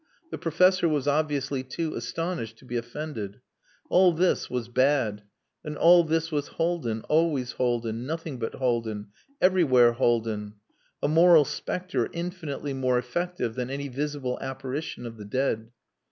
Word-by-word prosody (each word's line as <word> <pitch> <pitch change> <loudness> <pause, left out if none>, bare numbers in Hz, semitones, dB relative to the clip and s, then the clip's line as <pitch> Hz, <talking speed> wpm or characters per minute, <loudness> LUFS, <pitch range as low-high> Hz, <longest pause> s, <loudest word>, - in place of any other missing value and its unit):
The - - -5
professor 175 +1 +3
was 145 -3 0
obviously 145 -2 0
too 155 +5 -4
astonished 120 -3 -4
to - - -18
be 120 - -6
offended. 120 -4 -5 0.5
All 180 0 +5
this 175 +2 +1
was 125 -2 -3
bad. 125 -4 +2 0.4
And 150 -1 -5
all 175 +1 +7
this 160 0 0
was 145 -2 -1
Haldin, 160 -10 -1
always 150 -6 +1
Haldin 120 -1 -1
nothing 160 -4 -4
but 115 - -3
Haldin 115 -5 -1 0.3
everywhere 145 -11 +5
Haldin: 115 -4 0 0.5
a - - +3
moral 165 0 +6
spectre 160 -6 -2
infinitely 170 -5 -4
more 130 -2 +1
effective 125 +2 -2
than 125 +1 -3
any 140 +1 -4
visible 140 -1 -3
apparition 135 0 -5
of 115 -1 -7
the 105 - -9
dead. 115 -1 -1
135 Hz, 140 wpm, -27 LUFS, 120-160 Hz, 0.5 s, all